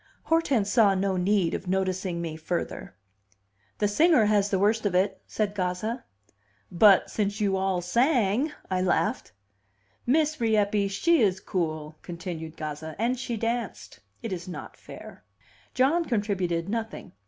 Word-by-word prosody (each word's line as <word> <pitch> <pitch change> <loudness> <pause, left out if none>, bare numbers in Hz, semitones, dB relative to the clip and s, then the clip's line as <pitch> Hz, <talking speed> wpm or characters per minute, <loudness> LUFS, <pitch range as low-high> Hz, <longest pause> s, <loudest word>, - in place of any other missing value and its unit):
Hortense 275 -11 +1
saw 210 -5 +4
no 190 0 0
need 185 -1 +1
of 185 - -4
noticing 185 -2 -1
me 160 -2 -4
further 165 +2 -4 0.8
"The 210 - +1
singer 300 +2 +4
has 205 -1 +2
the 195 - +1
worst 215 +3 +2
of 185 - -2
it," 190 +1 +1
said 210 -2 -2
Gazza. 205 +5 -3 0.7
"But 195 +2 +5
since 205 0 -1
you 200 -2 +1
all 190 -1 0
sang!" 240 - +2 0.2
I 185 0 +1
laughed. 185 -1 0 0.8
"Miss 305 +2 +2
Rieppe, 210 -2 +2
she 330 +11 +2
is 190 -3 +2
cool," 155 -5 -3
continued 170 -2 -7
Gazza. 155 +1 -6
"And 240 +3 0
she 245 -3 -3
danced. 230 +2 -4 0.2
It 225 -4 -3
is 175 -1 -6
not 180 - -8
fair." - - -12 0.5
John 295 +7 +3
contributed 190 - -1
nothing. 225 +1 -4
200 Hz, 140 wpm, -26 LUFS, 180-230 Hz, 0.8 s, But